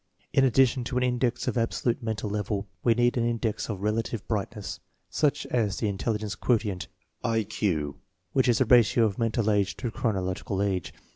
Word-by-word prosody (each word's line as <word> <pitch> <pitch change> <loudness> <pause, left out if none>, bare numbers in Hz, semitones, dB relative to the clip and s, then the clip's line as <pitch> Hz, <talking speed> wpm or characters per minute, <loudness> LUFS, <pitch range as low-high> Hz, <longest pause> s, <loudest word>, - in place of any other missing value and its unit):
In 135 - +5
addition 130 -1 +4
to 125 0 -2
an 125 - +2
index 125 0 0
of 125 - +1
absolute 115 +1 0
mental 110 -2 -3
level, 105 0 -2 0.2
we 115 -2 +4
need 120 +1 +2
an 120 0 +2
index 115 -2 -2
of 100 -3 -4
relative 110 0 -1
brightness. 105 -1 -3 0.3
Such 150 0 +1
is 110 -5 +1
the - - -1
intelli 105 +3 -1
gence 105 -2 -4
quotient 105 -6 0 0.4
(I 115 -2 +1
Q), 75 -9 -1 0.4
which 130 - +3
is 120 - +4
the 130 - +3
ratio 120 -1 +5
of 105 0 -2
mental 115 -1 +1
age 100 -2 +1
to 120 -2 -3
chronological 95 -2 -1
age. 95 -4 -1
115 Hz, 185 wpm, -27 LUFS, 100-120 Hz, 0.4 s, In